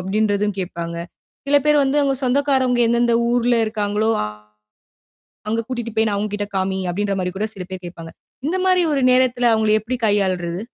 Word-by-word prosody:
அப்டின்றதும் 205 +1 0
கேட்பாங்க. 170 -2 -4 0.5
சில 285 +1 +4
பேர் 300 -1 +4
வந்து 270 +2 0
அவங்க 275 -1 +1
சொந்தக்காரவுங்க 260 -2 +2
எந்தெந்த 235 0 +2 0.2
ஊர்ல 245 0 +2
இருக்காங்களோ, 215 0 -1 1.4
அங்க 225 +1 0
கூட்டிட்டு 240 -3 -4
போய் 220 0 +3
நான் 205 -1 -1
அவங்க 205 0 -2
கிட்ட 205 0 -3
காமி 190 0 -1
அப்டின்ற 200 +2 -1
மாரி 180 - -1
கூட 215 - -1
சில 180 -2 -6
பேர் 185 -1 -7
கேட்பாங்க. 165 -1 -10 0.4
இந்த 360 +4 0
மாரி 365 -1 +3
ஒரு 270 -2 +1
நேரத்துல 250 -1 +3
அவங்கள 220 -1 +2
எப்படி 250 +3 -3
கையாள்றது? 185 -4 0
220 Hz, 170 wpm, -20 LUFS, 195-250 Hz, 1.4 s, சில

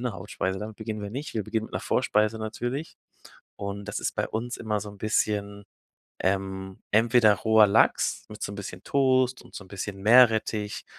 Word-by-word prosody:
'ner 125 -3 -2
Hauptspeise, 95 0 -3
damit 105 +1 -7
beginnen 110 -1 -5
wir 100 - -5
nicht. 135 +7 -6
Wir 110 - 0
beginnen 110 0 -2
mit - - -19
'ner - - -1
Vorspeise 105 +1 +1
natürlich 120 +7 -4 0.6
und 100 0 -5
das 105 - -4
ist - - -2
bei - - -1
uns 120 +3 -3
immer 105 -2 -2
so 105 +1 -7
'n 100 - -13
bisschen, 105 -1 -1 0.6
ähm, 95 0 -2
entweder 110 0 +5
roher 110 +1 +5
Lachs 100 - +2
mit 105 - -8
so - - -3
'n 100 - -7
bisschen 95 -1 -8
Toast 130 -2 +2
und - - -16
so - - -7
'n - - -17
bisschen 100 0 -6
Meerrettich, 110 -2 +4
105 Hz, 190 wpm, -26 LUFS, 100-115 Hz, 0.6 s, entweder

